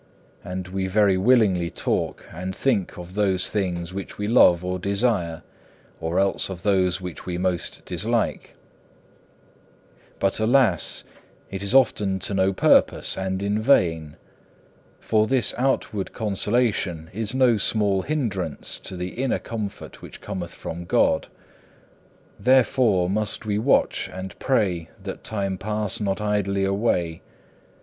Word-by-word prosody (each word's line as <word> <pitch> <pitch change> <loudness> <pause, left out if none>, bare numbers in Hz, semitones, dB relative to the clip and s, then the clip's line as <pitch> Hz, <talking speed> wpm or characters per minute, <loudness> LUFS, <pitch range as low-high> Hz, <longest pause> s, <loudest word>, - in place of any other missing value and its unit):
And 90 0 -5
we 95 0 -2
very 100 0 +3
willingly 95 -5 +3
talk - - -2
and 90 +3 -5
think 105 -9 0
of 90 +1 -9
those 95 -2 +1
things 90 -4 -2
which 95 0 -6
we 105 - -2
love 90 -7 +5
or 90 0 -2
desire, 100 -4 0 0.6
or 80 +2 -2
else 100 0 +1
of 90 -2 -7
those 95 -2 +2
which 90 -2 -8
we 90 -1 -2
most 90 -1 -2
dislike. - - -2 1.6
2. - - -31
But 95 +2 +1
alas! 110 - +2 0.5
it 95 - -5
is 100 +5 0
often 105 -7 +3
to 95 - -3
no 95 0 +2
purpose 95 - +4
and 95 0 -3
in 105 +2 0
vain. 80 - +2 0.8
For 110 -1 +1
this 130 -1 +3
outward 125 -6 -1
consolation 105 -6 -1
is 110 +3 -3
no 125 -4 +4
small 100 -2 +1
hindrance 100 - -3
to - - -6
the 90 +1 -3
inner 130 +6 -1
comfort 105 -4 -7
which - - -10
cometh 85 -2 -6
from 85 +1 -7
God. 80 -2 +2 1.1
Therefore 125 -7 +3
must 105 +3 -2
we 105 -1 0
watch 130 +6 +2
and 95 0 -8
pray 95 -11 0
that - - -7
time 100 -3 -2
pass 105 -1 -2
not 100 -2 -1
idly 100 -2 0
away. 95 -5 0
95 Hz, 135 wpm, -24 LUFS, 90-110 Hz, 1.6 s, love